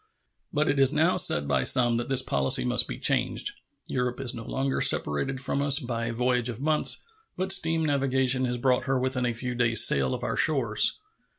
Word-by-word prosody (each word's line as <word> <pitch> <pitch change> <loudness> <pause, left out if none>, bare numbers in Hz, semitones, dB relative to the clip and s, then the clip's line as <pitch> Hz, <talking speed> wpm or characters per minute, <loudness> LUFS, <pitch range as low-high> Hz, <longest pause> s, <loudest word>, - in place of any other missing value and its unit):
But 150 -1 -1
it 140 - -1
is 135 -1 +4
now 160 +4 +1
said 75 - +3
by 65 -2 0
some 120 - +3
that 120 +1 -5
this 130 -1 +2
policy 70 - +1
must 60 - 0
be - - -7
changed. - - 0 0.4
Europe 125 0 -4
is 130 -3 -3
no 115 - -9
longer 135 +3 -3
separated 130 - +1
from 140 +1 -3
us 140 -1 +4
by 120 -5 -4
a - - -4
voyage 125 +1 -1
of 120 -1 -7
months, 155 +2 +1 0.3
but 190 +1 -2
steam 165 -2 +2
navigation 135 -2 0
has 125 0 -3
brought 125 +1 -1
her 135 -1 -1
within 130 -1 -2
a 120 - -2
few 125 +2 -5
days' 115 -2 +4
sail 65 -2 +3
of - - -9
our - - -3
shores. 120 -9 +1
125 Hz, 205 wpm, -25 LUFS, 115-135 Hz, 0.4 s, is